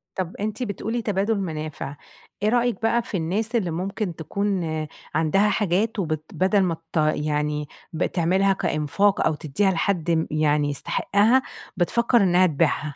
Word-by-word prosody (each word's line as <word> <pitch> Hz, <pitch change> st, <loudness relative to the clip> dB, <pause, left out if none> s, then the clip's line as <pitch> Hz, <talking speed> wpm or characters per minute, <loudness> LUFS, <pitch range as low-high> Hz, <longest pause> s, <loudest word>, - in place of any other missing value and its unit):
طَب 185 Hz, -2 st, -3 dB
أنتِ 215 Hz, +4 st, -3 dB
بتقولي 225 Hz, +2 st, -3 dB
تبادل 205 Hz, 0 st, 0 dB
منافع، 155 Hz, -5 st, -5 dB, 0.5 s
إيه 215 Hz, -, +4 dB
رأيِك 240 Hz, -3 st, +1 dB
بقى 235 Hz, +1 st, +2 dB
في 205 Hz, -, -4 dB
الناس 210 Hz, +8 st, -2 dB
اللي 185 Hz, -7 st, +1 dB
ممكن 185 Hz, +1 st, -3 dB
تكون 195 Hz, +3 st, -2 dB, 0.5 s
عندها 180 Hz, +7 st, +3 dB
حاجات 205 Hz, +2 st, 0 dB
وبت 155 Hz, -4 st, -2 dB
بدَل 190 Hz, +2 st, +2 dB
ما 170 Hz, -3 st, 0 dB, 0.2 s
ت -, -, -1 dB
يعني 150 Hz, -1 st, 0 dB, 0.3 s
بتعملها 185 Hz, +4 st, +2 dB
كإنفاق 175 Hz, +3 st, +1 dB
أو 155 Hz, -, +2 dB
تديها 155 Hz, +7 st, 0 dB
لحد 170 Hz, -1 st, 0 dB
م 160 Hz, -1 st, +1 dB
يعني 150 Hz, -1 st, +2 dB
يستحقها، 205 Hz, -, +2 dB, 0.4 s
بتفكَّر 235 Hz, +7 st, +2 dB
إنها 180 Hz, 0 st, +4 dB
تبيعها؟ 145 Hz, -1 st, 0 dB
185 Hz, 145 wpm, -24 LUFS, 155-205 Hz, 0.5 s, إيه